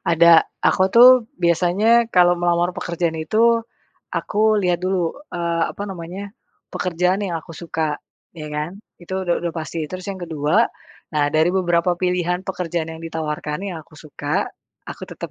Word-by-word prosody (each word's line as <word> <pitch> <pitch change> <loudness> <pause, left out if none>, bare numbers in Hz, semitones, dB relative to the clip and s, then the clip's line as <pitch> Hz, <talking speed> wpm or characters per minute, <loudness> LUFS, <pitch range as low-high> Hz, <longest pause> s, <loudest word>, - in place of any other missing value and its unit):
Ada, 165 0 +7 0.3
aku 185 - +2
tuh 245 +2 +10 0.3
biasanya 175 +6 +3 0.2
kalo 175 0 +6
melamar 175 0 +2
pekerjaan 170 -2 -2
itu 215 +8 +1 0.8
aku 210 +1 -2 0.2
lihat 175 -1 +1
dulu, 185 -2 +1 0.3
eee, 170 -1 0
apa - - -7
namanya 180 +2 -7 0.5
pekerjaan 180 +2 0
yang 170 -3 -2
aku 165 - -13
suka, 160 -2 -2 0.5
ya 150 - -6
kan? 150 +2 -2 0.3
Itu 185 +2 -6
udah 175 -1 +1
udah 170 -1 -3
pasti. 160 +1 -5
Terus 185 0 -6
yang 190 -1 -7
ke-2, 155 0 -1 0.6
nah 150 - +3
dari 160 +3 +4
beberapa 175 -1 +1
pilihan 180 0 0
pekerjaan 170 -3 -3
yang 160 - -10
ditawarkan 150 -2 -4
yang - - -6
aku 155 - -22
suka, 145 -1 -2 0.4
aku - - -10
tetap - - -7
170 Hz, 155 wpm, -21 LUFS, 160-180 Hz, 0.8 s, tuh